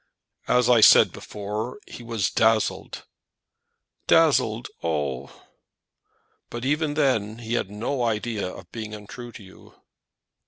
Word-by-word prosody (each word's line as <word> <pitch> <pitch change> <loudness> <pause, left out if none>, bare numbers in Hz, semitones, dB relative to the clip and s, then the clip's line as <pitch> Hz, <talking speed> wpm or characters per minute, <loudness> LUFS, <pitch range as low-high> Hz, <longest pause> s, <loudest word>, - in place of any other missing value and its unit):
"As 125 -1 +3
I 120 -2 +5
said - - +7
before, 105 +4 -6
he - - -10
was 115 -4 -2
dazzled 110 -1 0 0.5
" - - -53
"Dazzled! 125 -8 +3 0.2
oh!" 70 -5 -3 1.1
"But 120 +1 -6
even 150 +1 0
then 115 -8 +1
he 115 0 -5
had 120 - -1
no 115 +6 -3
idea 110 -3 -1
of 90 -2 -13
being 110 -2 -6
untrue 120 +4 -10
to 110 - -11
you." 95 - -17
115 Hz, 125 wpm, -24 LUFS, 105-125 Hz, 1.1 s, said